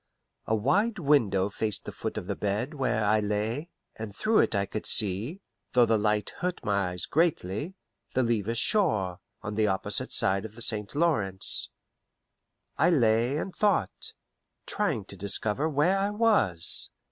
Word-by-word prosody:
A 110 - +2
wide 200 - +1
window 115 - +2
faced 105 0 -3
the - - -5
foot 110 - -5
of 105 - -4
the - - -3
bed 105 +8 -2
where 130 -7 0
I 110 +1 +3
lay, 105 +9 -2 0.3
and 110 -2 -7
through 220 - +2
it - - +2
I 100 0 +1
could 105 +2 -5
see 110 - +2 0.3
though 125 -2 +5
the 110 -2 +2
light 105 -1 0
hurt 180 -7 -3
my 100 -3 +1
eyes 90 -1 -5
greatly 155 - -1 0.4
the 130 - +3
Levis 115 -1 -1
shore, 110 - +1 0.2
on 105 - -4
the 110 0 +1
opposite 95 -1 -2
side 95 +1 +3
of 110 -1 -9
the 120 - -2
St. 105 +2 0
Lawrence. 110 - +2 1.1
I 160 +4 +5
lay 120 -3 +2
and 185 +4 -4
thought, 200 - 0 0.5
trying - - -1
to - - -9
discover 105 +8 -2
where 160 +7 +2
I 200 +1 0
was. 205 - +2
110 Hz, 160 wpm, -27 LUFS, 100-150 Hz, 1.1 s, though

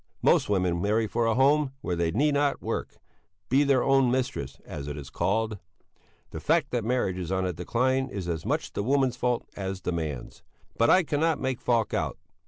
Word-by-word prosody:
Most - - +4
women 90 -4 +1
marry 110 +3 +2
for 115 +2 0
a 115 - +2
home 140 +1 +3
where 90 - -2
they 85 -1 0
need 145 - +2
not 145 0 +1
work - - -4 0.5
be 135 +3 +4
their 140 -3 +3
own 135 -2 +4
mistress, 120 - -2
as 70 - -7
it 75 0 -5
is 70 -2 -8
called. 110 +1 0 0.7
The 80 - -5
fact 150 - +1
that 120 -2 -1
marriage 110 -6 0
is 90 -1 -4
on 95 0 0
the 90 -1 -1
decline 130 +10 0
is 95 -7 -5
as 80 -3 -2
much - - -2
the - - -2
woman's 130 +2 +2
fault 125 -1 -1
as 95 -1 -4
the 90 - -2
man's. 80 -7 -5 0.3
But 115 - +3
I 185 0 +6
cannot 155 +1 +1
make 130 -2 -2
Falk 115 -2 +1
out. - - -1
115 Hz, 200 wpm, -27 LUFS, 90-135 Hz, 0.7 s, I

